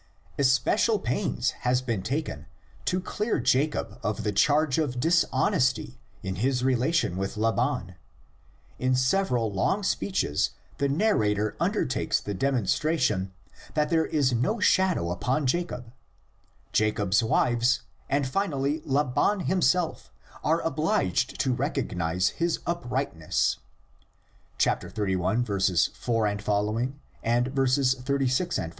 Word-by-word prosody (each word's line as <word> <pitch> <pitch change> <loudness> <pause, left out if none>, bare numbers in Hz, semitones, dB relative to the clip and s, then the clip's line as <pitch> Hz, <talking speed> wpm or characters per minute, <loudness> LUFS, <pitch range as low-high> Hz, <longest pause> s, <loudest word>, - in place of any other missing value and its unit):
Especial 140 - +3
pains 125 -5 -1
has 125 0 +2
been 115 -6 -2
taken 110 - -3 0.4
to 180 - +1
clear 210 +4 -2
Jacob 130 +5 0
of 105 +1 -2
the 105 - 0
charge 145 +6 +3
of 130 -6 -1
dishonesty 165 -2 +1 0.2
in 95 -1 -4
his 125 +4 0
relations 130 - +1
with 95 +2 -3
Laban: 115 - 0 0.9
in 130 0 +2
several 130 - +1
long 190 - 0
speeches 185 - 0 0.2
the 140 0 +1
narrator 110 - +1
undertakes - - 0
the 105 - -5
demonstration 115 - 0 0.4
that 150 +1 +1
there 160 -1 +2
is 140 -5 +1
no 125 - 0
shadow 185 - +2
upon 130 +11 -1
Jacob; 125 -5 -2 0.8
Jacob's 105 -1 +2
wives 120 +2 +2 0.3
and 140 0 +1
finally 145 -2 -1
Laban 145 +8 +1
himself 180 -2 0 0.3
are 160 +2 +2
obliged 130 - 0
to 130 - +1
recognise 90 - -1
his 170 -1 -1
uprightness 130 - -1 1.0
(xxxi. 95 -1 +1
4 110 -4 -1
ff.; 125 +4 0
36 140 +5 0
ff.). 80 - -3
130 Hz, 105 wpm, -27 LUFS, 110-155 Hz, 1.0 s, Especial